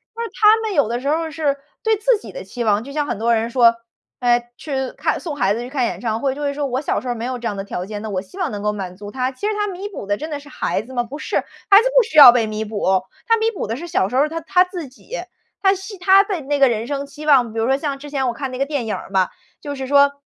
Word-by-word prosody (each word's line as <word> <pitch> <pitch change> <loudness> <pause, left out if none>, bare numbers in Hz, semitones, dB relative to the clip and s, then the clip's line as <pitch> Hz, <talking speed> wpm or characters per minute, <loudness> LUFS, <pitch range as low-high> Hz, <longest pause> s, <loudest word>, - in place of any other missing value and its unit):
那 465 - -3
他 430 +1 +5
们 440 -3 -3
有 285 -8 +3
的 240 +1 -2
时 275 - -5
候 325 +2 +1
儿 320 - -5
是 290 -3 0 0.2
对 445 -1 +2
自 450 +2 +2
己 - - -10
的 - - -7
期 245 -1 -5
望。 210 0 +2
就 280 - -9
像 295 0 -1
很 - - -2
多 230 +2 +2
人 225 +1 0
说， 235 -2 +5 0.5
诶 240 -1 +2
去 265 -4 -3
看 310 +2 -1
送 310 -5 -5
孩 200 -6 +1
子 235 - -4
去 245 - -6
看 260 -2 -1
演 - - -3
唱 225 -2 -2
会， 270 -1 0
就 295 - -7
会 280 0 0
说 285 -1 -2
我 255 +1 -1
小 - - -1
时 255 - -8
候 245 - 0
儿 - - -9
没 230 - -4
有 255 -1 -3
这 235 - -3
样 205 - -3
的 195 - -3
条 180 -2 -5
件， 205 +1 -6
那 220 - -4
我 185 -1 -1
希 205 - -15
望 360 - -1
能 205 -1 -5
够 210 0 +1
满 190 -3 -6
足 205 +1 -9
他。 255 +2 -2
其 405 +11 -4
实 430 - 0
他 415 0 0
弥 390 +2 -5
补 295 - -7
的 205 +1 0
真 310 +2 -6
的 295 -1 -4
是 290 +1 -15
孩 210 - -2
子 260 +3 -12
吗？ 240 -1 0
不 275 +5 -8
是， - - -2
孩 400 +2 +3
子 - - +1
不 - - +8
需 430 -7 -9
要 250 -4 +12
被 235 -2 +2
弥 215 0 -3
补， 195 -3 0 0.3
他 455 0 +4
弥 445 +1 +1
补 420 - -4
的 225 - -3
是 340 +7 -7
小 255 - +1
时 250 - -5
候 270 - +5
儿 305 - -1
他 330 +1 -4
他 360 +3 +4
自 360 -5 -7
己， 275 - -10 0.5
他 385 0 +5
希 385 +2 -7
他 385 +2 +6
的 385 -6 -3
那 285 +1 -1
个 270 - +6
人 225 -1 -1
生 280 +1 -3
期 295 +2 -10
望。 255 -7 +4
比 225 - -3
如 225 - +1
说 265 - +3
像 280 0 -3
之 290 +1 -10
前 265 -3 0
我 240 - 0
看 270 -3 -5
那 255 - -6
个 275 - 0
电 285 -6 -2
影 215 - -2
儿 - - -8
嘛， 190 -2 +2 0.3
就 285 -1 -6
是 265 -1 -5
说 280 0 +5
275 Hz, 350 characters per minute, -20 LUFS, 230-325 Hz, 0.5 s, 要